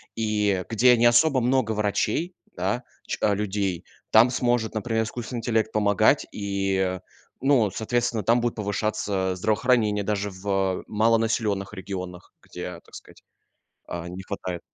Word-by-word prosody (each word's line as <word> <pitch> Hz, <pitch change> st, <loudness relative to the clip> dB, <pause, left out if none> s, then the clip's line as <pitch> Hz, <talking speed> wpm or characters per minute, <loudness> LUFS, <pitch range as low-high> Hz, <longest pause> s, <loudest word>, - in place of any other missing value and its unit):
и 105 Hz, -4 st, 0 dB
где 120 Hz, +2 st, +5 dB
не 115 Hz, -, +3 dB
особо 130 Hz, +3 st, +4 dB
много 125 Hz, -2 st, +1 dB
врачей, 110 Hz, -, -1 dB, 0.2 s
да, 100 Hz, +8 st, -1 dB, 0.2 s
ч -, -, -2 dB
э, 105 Hz, -, +3 dB
людей, 100 Hz, -3 st, -2 dB, 0.3 s
там 115 Hz, +3 st, +7 dB
сможет, 120 Hz, -3 st, 0 dB
например, 110 Hz, +1 st, 0 dB
искусственный 120 Hz, +2 st, -5 dB
интеллект 110 Hz, -1 st, 0 dB
помогать 100 Hz, -2 st, +3 dB
и, 95 Hz, -2 st, -1 dB, 0.4 s
ну, 130 Hz, -7 st, +3 dB
соответственно, 120 Hz, +2 st, -1 dB
там 120 Hz, +1 st, +3 dB
будет 120 Hz, 0 st, -1 dB
повышаться 100 Hz, -2 st, -1 dB
здравоохранение 105 Hz, +1 st, +1 dB
даже 105 Hz, 0 st, -1 dB
в 95 Hz, -1 st, -1 dB
малонаселённых 110 Hz, -2 st, +1 dB
регионах, 90 Hz, -2 st, -7 dB
где, -, -, -7 dB
так -, -, -23 dB
сказать, -, -, -13 dB, 0.7 s
э, 85 Hz, 0 st, -5 dB
не 90 Hz, +2 st, -7 dB
хватает. 90 Hz, -3 st, -5 dB
105 Hz, 135 wpm, -25 LUFS, 95-115 Hz, 0.7 s, там